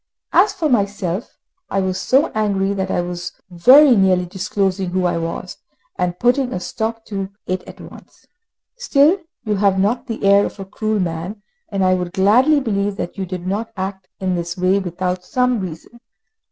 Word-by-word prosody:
As 415 - +5
for 360 -6 -1
myself, 200 - -1 0.3
I 195 - 0
was 185 -1 -1
so 275 +5 +2
angry 200 -2 0
that 190 -1 -2
I 175 - 0
was 175 0 -5 0.2
very 255 - +7
nearly 185 -3 +3
disclosing 190 0 -1
who 185 0 0
I 175 -1 +1
was, 165 0 -5 0.4
and 180 -1 -1
putting 250 +3 +2
a - - -2
stop 225 +3 -4
to 195 -2 -4 0.2
it 185 0 -2
at - - -11
once. - - -14 0.5
Still, 320 - +3 0.3
you 210 -2 0
have 195 -1 +2
not 235 +7 0
the 225 -4 -5
air 200 +1 +5
of - - -5
a 195 - -5
cruel 215 +2 -2
man, 180 +4 -4 0.3
and 195 -2 0
I 185 - +4
would 180 -1 -2
gladly 250 +10 +4
believe 205 -5 -1
that 175 - -5
you 190 - -3
did 180 -1 -6
not 210 +5 -2
act 190 0 -5
in 185 -1 -1
this 170 0 -3
way 185 +2 +2
without 180 0 -3
some 250 +4 +1
reason. 185 +6 -8
195 Hz, 180 wpm, -19 LUFS, 185-225 Hz, 0.5 s, very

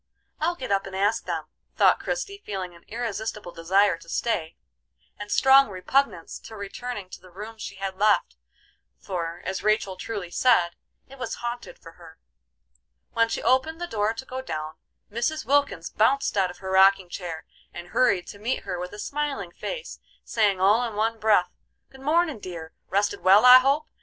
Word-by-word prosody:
I'll 335 +3 0
get 255 -8 -6
up 195 0 +1
and 190 - -8
ask 205 +3 +1
them," - - -2 0.3
thought - - +5
Christie, 400 -5 -4
feeling 190 -3 -5
an 170 - -18
irresistible 220 -4 -4
desire 185 +2 +2
to 165 - -15
stay, 165 -6 -1 0.6
and 205 0 -7
strong 270 -1 +6
repugnance 190 0 -1
to 220 - -11
returning 205 +1 -6
to - - -10
the 185 - -16
room 210 +5 -9
she 200 - -6
had 195 0 -4
left, 205 - +3 0.6
for, 170 -2 -5
as 190 - -3
Rachel 215 -3 +1
truly 190 -2 -5
said, 180 -6 +3 0.4
it 270 0 -14
was 255 - -3
haunted 240 0 -5
for 165 - -13
her. 165 -2 -15 0.9
When 230 0 +2
she - - -3
opened 315 +6 +2
the 350 - -2
door 220 -7 -1
to 230 - -7
go 260 0 -5
down, 155 -10 -5 0.3
Mrs. 240 +8 -1
Wilkins 280 -12 +1
bounced 270 +5 +2
out 190 -2 +2
of 180 - -10
her 190 -1 -6
rocking 190 0 +5
chair 175 -3 -6 0.3
and 175 0 -9
hurried 215 -8 +2
to 200 - -10
meet 235 +5 -2
her 180 - -4
with 180 0 -6
a - - -8
smiling 280 -10 -3
face, 485 - -6 0.2
saying 205 -4 +1
all 205 +6 +4
in 230 -3 -4
one 225 +2 0
breath: 205 -5 +3 0.4
"Good 265 - -15
mornin', 310 -1 +1
dear! 170 -4 -8 0.2
Rested 200 +2 +1
well, 195 +5 +6
I 250 0 +11
hope? 280 +4 +1
210 Hz, 180 wpm, -25 LUFS, 185-255 Hz, 0.9 s, I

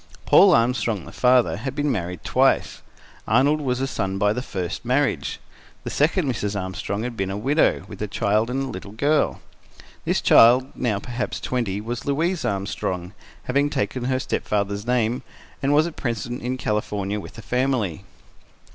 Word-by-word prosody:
Paul 195 -4 +7
Armstrong, 115 -4 +1
the - - -10
father, 125 -1 +3
had 130 +5 -5
been 145 0 0
married 90 -6 -3
twice. - - +2 0.5
Arnold 140 +7 +3
was 125 -3 -1
a - - +1
son 95 -7 -2
by 105 +1 +2
the 125 - -3
first 95 -7 -4
marriage. 130 +4 0 0.4
The - - -5
second 155 +2 +2
Mrs. 105 -5 -2
Armstrong 95 +3 -4
had 120 -1 -4
been 95 -3 -2
a 95 - -3
widow, 140 +9 +2
with - - -10
a 105 - -1
child, 105 +3 +1
a 125 - -3
little 125 -7 -4
girl. 145 +7 +1 0.6
This - - +1
child, 125 +3 +6
now 115 -5 0
perhaps 120 +4 -4
twenty, 115 -6 -2
was 115 +3 -5
Louise 160 +5 0
Armstrong, 95 -2 -3 0.3
having 140 +3 +1
taken 130 -3 -2
her 130 0 +1
stepfather's 100 -3 -2
name, 120 -1 +1 0.4
and 140 - +1
was 150 +2 +4
at 170 - -6
present 120 0 -3
in 125 +2 -2
California 105 -3 -2
with - - -10
the 115 - -10
family. 120 - -1
120 Hz, 165 wpm, -23 LUFS, 100-135 Hz, 0.6 s, Paul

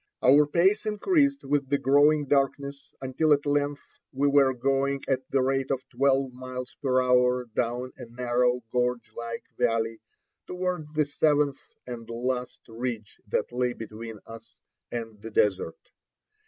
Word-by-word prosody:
Our 145 +3 +6
pace 190 +8 +2
increased 280 - +2
with 140 -1 0
the 140 - +3
growing 145 +2 +4
darkness 140 0 0
until 140 +4 +2
at 145 0 0
length 145 0 0 0.3
we 140 +1 +1
were 140 -1 +5
going 135 +2 0
at 130 -1 -1
the 135 -1 +2
rate 135 0 0
of 130 -1 -2
twelve 135 0 +1
miles 130 +2 -7
per 130 -2 +2
hour 125 0 +3
down 125 +2 -1
a - - -8
narrow 125 +1 0
gorge 125 -2 -1
like 115 0 -5 0.2
valley 115 0 +1 0.5
toward 180 -4 -3
the 150 -1 +3
seventh 145 -1 +2 0.3
and 120 -2 -8
last 125 +2 -3
ridge 115 -2 -5
that - - -1
lay 125 0 0
between 110 0 -8
us 115 -2 -12 0.3
and 115 -3 -6
the 115 - -7
desert. 95 -6 +1
130 Hz, 145 wpm, -27 LUFS, 120-145 Hz, 0.5 s, Our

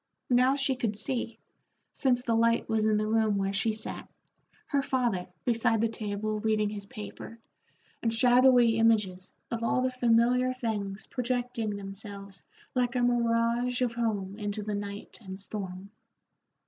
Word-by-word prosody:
Now 255 +2 +5
she 270 -1 +1
could 230 -4 -1
see, 230 0 -3 0.6
since 250 -3 +2
the 235 - 0
light 230 +1 +2
was 220 -1 +1
in 215 -1 +3
the 215 - 0
room 215 -1 +2
where 195 0 -1
she 220 +2 +1
sat, 215 0 -6 0.6
her 280 -2 +1
father 240 -9 0 0.2
beside 230 -2 +2
the 230 +1 +2
table 215 -1 -3
reading 215 -1 +1
his 200 -1 -3
paper, 215 +2 -9 0.6
and 230 - +1
shadowy 245 -1 +5
images 210 -5 +2 0.2
of 230 -1 -2
all 240 +2 +1
the 255 - +1
familiar 250 +1 +3
things 215 -4 -3
projecting 245 -4 -2
themselves 200 -1 -9 0.3
like 245 -1 0
a 245 - +2
mirage 240 +1 +2
of 240 -2 0
home 210 -4 -2
into 205 0 -3
the 210 0 -3
night 205 0 -6
and 190 -2 -8
storm. 195 -1 -7
225 Hz, 150 wpm, -29 LUFS, 205-245 Hz, 0.6 s, Now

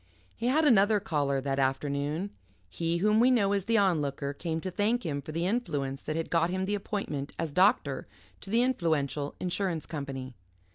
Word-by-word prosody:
He 235 - -2
had 305 +5 +3
another 210 -5 +5
caller 145 -9 0
that 135 0 -1
afternoon; 140 +7 -1 0.4
he 165 0 -1
whom 210 +4 +3
we 245 +2 +6
know 205 -6 +3
as 200 -2 0
the 230 0 +2
Onlooker 145 -8 +1
came 160 +2 -3
to 185 - -4
thank 220 +6 0
him 145 -3 -2
for 155 - -8
the 165 +2 -1
influence 145 - -1
that 155 - -4
had 165 0 -3
got 165 0 +3
him 185 +1 -1
the 205 - -1
appointment 195 -9 -3
as 165 -2 -2
doctor 165 -6 +2 0.3
to - - -11
the 230 +4 +3
Influential 155 - 0
Insurance 180 -2 -1
Company. 135 -4 -5
170 Hz, 185 wpm, -29 LUFS, 145-205 Hz, 0.4 s, we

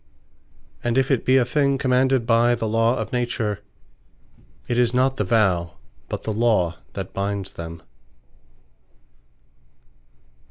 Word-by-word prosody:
And 120 +1 0
if 135 +1 +2
it 130 - +1
be 130 +1 +4
a 125 - +3
thing 140 +2 +1
commanded 130 -1 +2
by 120 +1 +3
the 115 -1 -3
Law 115 +2 +2
of - - -5
Nature, 120 -4 -1 1.1
it 120 0 0
is 120 0 +2
not 130 +1 +2
the - - +1
Vow, 90 - +1 0.3
but - - -4
the 110 - -2
Law 105 -7 +1
that - - -6
binds 100 -1 -3
them. 85 0 -8
115 Hz, 130 wpm, -23 LUFS, 100-125 Hz, 1.1 s, be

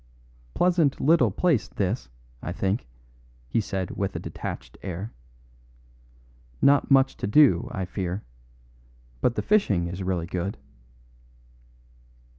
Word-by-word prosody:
"Pleasant 175 -6 +3
little 165 +3 +4
place, 165 -12 +1
this, 100 - -2 0.3
I 90 - -4
think," 95 - -1 0.6
he 65 - +1
said 95 -3 -3
with 100 0 -3
a - - -2
detached - - -7
air. 95 +3 -5 1.5
"Not 140 - +4
much 135 -1 +4
to - - -3
do, 105 - +5
I 95 - -3
fear; 90 +1 -4 1.0
but 120 - +2
the - - -1
fishing 110 - +2
is 90 +2 -6
really 90 -3 -1
good." 90 +3 -3
100 Hz, 115 wpm, -26 LUFS, 90-140 Hz, 1.5 s, do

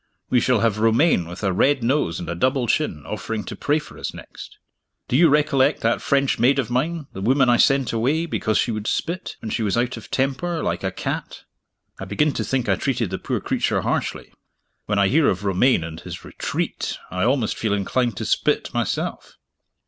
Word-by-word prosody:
We 125 - +5
shall 125 -3 +2
have 110 -2 +1
Romayne 115 - +3
with 85 +4 -9
a 95 -2 +1
red 135 +6 +2
nose 115 - +1
and 85 - -6
a 85 - -2
double 130 - +1
chin, 100 - -1
offering 105 0 -4
to - - -7
pray 145 +1 +1
for 150 - -9
us - - -5
next! - - -11 0.5
Do - - -1
you 165 +3 +6
recollect 145 -2 +3
that 115 +1 +1
French 140 -1 +1
maid 130 +4 +4
of 125 -4 -1
mine 155 +5 -1
the 95 - -6
woman 130 +4 +3
I 120 - +5
sent 135 -2 +3
away, 140 +9 +1
because 110 -9 0
she 120 - +1
would 110 -1 -4
spit, 180 +3 -2
when 110 - -5
she - - -1
was 105 0 0
out 120 +1 0
of 105 -4 -11
temper, 150 +6 -1
like - - -2
a - - 0
cat? - - -5 0.6
I 95 - -5
begin 125 +11 +1
to - - -2
think 130 -3 -1
I 100 - +3
treated 120 -7 -1
the 95 - -3
poor - - -2
creature - - 0
harshly. - - -2 0.5
When 105 - 0
I 100 -1 +4
hear 150 +6 +3
of 95 +1 -2
Romayne 100 +1 +3
and 80 0 -7
his - - -9
Retreat, - - -3
I 90 +1 -1
almost 120 -2 +1
feel 105 -3 0
inclined 115 +2 -1
to - - -3
spit, - - 0
myself. - - -3
120 Hz, 210 wpm, -22 LUFS, 105-140 Hz, 0.6 s, you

